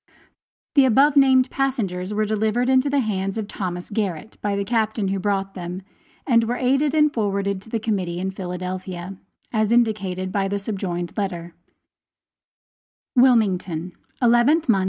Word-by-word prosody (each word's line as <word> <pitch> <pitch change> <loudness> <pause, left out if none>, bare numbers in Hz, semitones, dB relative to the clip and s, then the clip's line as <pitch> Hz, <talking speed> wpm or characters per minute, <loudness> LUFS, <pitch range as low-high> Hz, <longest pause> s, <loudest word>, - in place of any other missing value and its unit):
The 280 -3 +6
above 270 +4 +4
named 265 -2 +5
passengers 210 -9 -2
were 215 +1 0
delivered 220 +4 0
into 260 +2 +3
the 280 -1 +2
hands 195 -3 -2
of 215 -2 -3
Thomas 180 -3 -5
Garrett 200 -1 -3
by 205 -1 -1
the 200 0 -2
Captain 220 -3 0
who 195 0 -1
brought 195 0 -1
them, 180 +1 -6 0.4
and 230 -4 +3
were 240 +2 -1
aided 270 +4 +1
and 300 -1 +4
forwarded 200 -3 -1
to 210 - -15
the 230 - -1
Committee 195 -6 -2
in 190 +2 -2
Philadelphia, 185 0 -6 0.4
as 215 -1 +1
indicated 200 -6 +1
by 195 -1 0
the 200 +1 -1
subjoined 190 -4 -4
letter: 175 -5 -4 1.6
WILMINGTON, 190 -9 +2 0.3
11th 240 +7 +4
mo. 215 -5 +4
205 Hz, 150 wpm, -22 LUFS, 185-240 Hz, 1.6 s, The